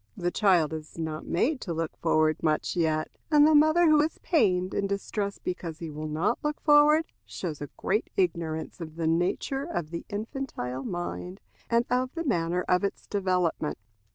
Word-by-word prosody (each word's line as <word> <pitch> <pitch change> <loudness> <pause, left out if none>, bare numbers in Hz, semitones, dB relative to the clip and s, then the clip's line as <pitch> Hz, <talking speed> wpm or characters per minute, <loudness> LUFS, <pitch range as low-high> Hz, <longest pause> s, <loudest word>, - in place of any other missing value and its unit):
The 175 0 -1
child 175 -7 +3
is 155 0 -8
not 160 -1 -4
made 255 - +1
to 170 -4 -4
look 165 -1 -3
forward 155 0 +2
much 155 +2 0
yet, 160 -2 0 0.2
and 295 -1 +6
the 310 - +5
mother 310 +3 +5
who 305 -1 +6
is 310 +2 -1
pained 190 - +2
and 200 -1 -1
distressed 200 0 -3
because 170 -3 -4
he 165 -2 -6
will 155 +1 -5
not 160 +10 0
look 300 0 -1
forward, 300 +1 +6 0.2
shows 160 -6 -6
a 145 - -5
great 210 +3 0
ignorance 165 -2 -1
of 155 -1 -7
the 165 -1 -2
nature 175 +11 0
of 175 - -4
the 170 - -4
infantile 210 - -4
mind, 180 +1 -5 0.3
and 235 0 +3
of 255 +2 0
the 335 - -2
manner 180 - 0
of 180 +2 +2
its 200 - -3
development. 180 -6 0
180 Hz, 180 wpm, -27 LUFS, 160-250 Hz, 0.3 s, and